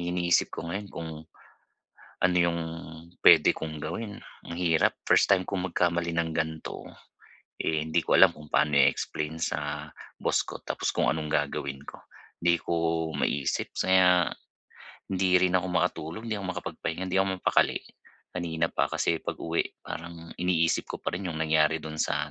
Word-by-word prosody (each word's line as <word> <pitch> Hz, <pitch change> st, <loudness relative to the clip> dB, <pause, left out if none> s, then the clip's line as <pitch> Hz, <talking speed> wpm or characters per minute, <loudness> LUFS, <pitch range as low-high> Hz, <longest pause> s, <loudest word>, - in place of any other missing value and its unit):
Iniisip 85 Hz, 0 st, +1 dB
ko -, -, -6 dB
ngayon 100 Hz, +2 st, -4 dB
kung 80 Hz, -3 st, -6 dB, 1.1 s
ano 90 Hz, 0 st, +2 dB
yung 85 Hz, -1 st, +2 dB, 0.6 s
puwede -, -, +7 dB
kong 80 Hz, -1 st, -6 dB
gawin, 105 Hz, +7 st, -5 dB, 0.3 s
ang 85 Hz, -, -5 dB
hirap. 80 Hz, -3 st, +2 dB
First -, -, +4 dB
time 95 Hz, -2 st, +4 dB
kong 95 Hz, -1 st, -2 dB
magkamali 85 Hz, 0 st, +1 dB
ng 85 Hz, -1 st, -1 dB
gan'to. 80 Hz, 0 st, -3 dB, 0.8 s
Eh, 80 Hz, -1 st, 0 dB
hindi 80 Hz, -, +1 dB
ko -, -, +3 dB
alam -, -, +7 dB
kung 75 Hz, -1 st, -13 dB
paano 75 Hz, -, +2 dB
i-explain 75 Hz, +2 st, +1 dB
sa 75 Hz, -1 st, -3 dB, 0.3 s
boss -, -, +1 dB
ko -, -, -8 dB
tapos -, -, -2 dB
kung -, -, +1 dB
anong 80 Hz, -1 st, -1 dB
gagawin 70 Hz, -2 st, -1 dB
ko. -, -, -11 dB, 0.3 s
'Di 85 Hz, 0 st, +2 dB
ko -, -, -3 dB, 0.4 s
maisip 70 Hz, -2 st, -1 dB
kaya 90 Hz, -2 st, +4 dB, 0.9 s
hindi 95 Hz, -1 st, +3 dB
rin 90 Hz, 0 st, +3 dB
ako 90 Hz, -, -3 dB
makatulog, 85 Hz, +9 st, -2 dB
hindi 110 Hz, -3 st, -3 dB
ako 95 Hz, -, -5 dB
makapagpahinga, 85 Hz, +3 st, -4 dB
hindi 95 Hz, -, +2 dB
ako 95 Hz, -, +1 dB
mapakali, 90 Hz, -, +2 dB, 0.5 s
kanina 85 Hz, -2 st, -2 dB
pa. -, -, +1 dB
Kasi 80 Hz, -, 0 dB
pag-uwi, 85 Hz, 0 st, -3 dB
parang 85 Hz, 0 st, -8 dB
iniisip 85 Hz, -2 st, +1 dB
ko -, -, -5 dB
pa -, -, -1 dB
rin 95 Hz, +2 st, -3 dB
yung 80 Hz, -, -4 dB
nangyari 80 Hz, 0 st, +2 dB
dun 80 Hz, 0 st, -7 dB
sa 75 Hz, -1 st, -1 dB
85 Hz, 160 wpm, -28 LUFS, 80-90 Hz, 1.1 s, puwede